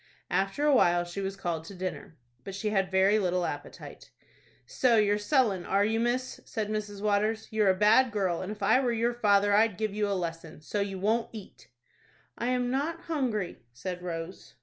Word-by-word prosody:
After 195 +10 0
a 295 - +4
while 175 -8 +4
she 175 +3 -6
was 195 0 -3
called 170 -4 -3
to 200 - -10
dinner, 180 -3 -6 0.3
but 195 - -7
she 210 +2 -2
had 195 -3 +1
very 190 +3 +3
little 180 -2 0
appetite. - - -8 0.6
"So 250 -3 +2
you're 205 -1 +3
sullen, 210 -5 +1
are 200 +2 +2
you, 225 +1 0
miss?" 245 +2 -1
said 215 -3 -4
Mrs. 210 -2 -4
Waters. 215 +1 +1
"You're 215 -2 +3
a 190 - +4
bad 220 +6 +5
girl, 190 -5 -1
and 185 - -5
if 210 -1 -7
I 220 +5 +5
were 250 -3 +1
your 235 +1 0
father, 205 -3 +3
I'd 215 -2 +3
give 215 -1 -2
you 210 0 0
a 200 - 0
lesson. 165 -2 -5
So 205 +6 -3
you 195 -1 -3
won't 220 +5 0
eat!" 185 - -11 0.7
"I 235 - -3
am 250 -1 0
not 310 +5 -2
hungry," 250 - -2
said 180 +8 -6
Rose. 170 0 -7
205 Hz, 195 wpm, -28 LUFS, 185-225 Hz, 0.7 s, bad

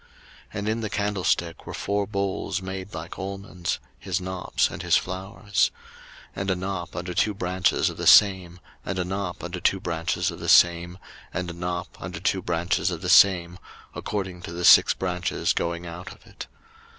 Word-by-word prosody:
02:037:020 - - -28 0.5
And 100 +1 -2
in 110 +1 -1
the 110 - -3
candlestick 95 -5 -1
were - - -6
four 100 0 -1
bowls 100 -1 -2
made 95 +1 -6
like 80 +1 -7
almonds, 95 -2 -4 0.2
his 95 0 -2
knops, 95 0 -1
and - - -6
his - - +4
flowers: 95 +2 -1 0.7
02:037:021 - - -4
And 95 - -2
a 95 - +2
knop 90 -2 -4
under 90 +1 -4
two 105 +4 +1
branches 90 0 +1
of - - -11
the - - -2
same, 95 -4 +6 0.2
and 100 - -3
a 90 - -1
knop 95 -1 -4
under 90 +1 -5
two 95 +2 +2
branches 90 +1 -1
of 85 - -9
the 85 - -3
same, 85 +1 +5 0.3
and 90 -2 -3
a - - -8
knop 90 +1 -5
under 85 -1 -6
two 95 +1 0
branches 85 0 0
of - - -5
the - - -2
same, 90 -3 +5 0.3
according 95 -4 -4
to 85 - -7
the 85 +1 -3
six - - +8
branches 90 -2 -1
going 85 0 -2
out 90 +2 -8
of - - -16
it. - - -10
90 Hz, 185 wpm, -25 LUFS, 85-95 Hz, 0.7 s, six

